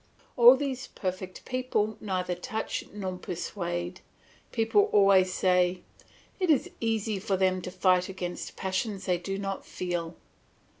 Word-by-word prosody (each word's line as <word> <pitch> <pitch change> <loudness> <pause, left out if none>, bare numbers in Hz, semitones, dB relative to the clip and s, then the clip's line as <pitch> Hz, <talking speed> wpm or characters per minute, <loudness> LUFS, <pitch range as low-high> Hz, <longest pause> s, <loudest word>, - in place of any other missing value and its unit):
All 245 +2 +9
these 265 -2 -3
perfect 185 -1 -5
people 255 -4 -1
neither 185 -3 -1
touch 220 +5 -4
nor 190 -3 -4
persuade; 175 0 -4 0.5
people 245 - +3
always 195 -2 +5
say, 180 -1 +2 0.6
"It 365 -2 +1
is 295 -4 +3
easy 220 -2 -1
for 195 0 0
them 185 -1 +2
to 180 - -5
fight 185 0 +2
against 180 -2 -5
passions 190 +1 -2
they 180 -2 +1
do 195 +2 -4
not 195 -1 -4
feel." 175 -2 -4
190 Hz, 135 wpm, -28 LUFS, 180-220 Hz, 0.6 s, All